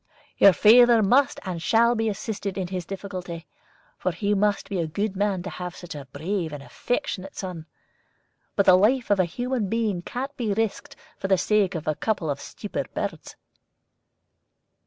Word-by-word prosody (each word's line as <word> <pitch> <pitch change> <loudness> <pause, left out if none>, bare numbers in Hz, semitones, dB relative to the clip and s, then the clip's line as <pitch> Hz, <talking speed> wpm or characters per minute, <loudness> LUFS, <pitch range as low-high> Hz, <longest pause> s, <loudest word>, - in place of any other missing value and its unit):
"Your 200 - +9
father 235 +5 +6
must 275 +8 +3
and 180 -3 -4
shall 230 +6 +4
be 225 -1 0
assisted 200 -1 -4
in 185 -2 -3
his 180 -3 -4
difficulty, 185 -4 -6 0.5
for 185 - 0
he 200 +5 -1
must 205 0 +1
be 195 -3 -3
a 165 - -1
good 200 +5 -2
man 195 -2 0
to 195 - -5
have 180 -1 -6
such 175 -1 -9
a 145 -2 -8
brave 165 +2 -3
and 145 -2 -7
affectionate 195 - -3
son. 175 -4 -6 0.9
But 200 - +3
the 185 - +7
life 220 +6 +3
of 200 - +3
a 185 - +4
human 245 +3 -2
being 220 -5 0
can't 265 +9 -5
be 225 -6 -1
risked 225 -1 -2 0.2
for - - -2
the 190 -1 +4
sake 200 -1 +1
of 160 -2 -5
a 155 - +2
couple 170 -3 -1
of 140 - -5
stupid 205 - -6
birds." - - -4
195 Hz, 180 wpm, -25 LUFS, 180-220 Hz, 0.9 s, Your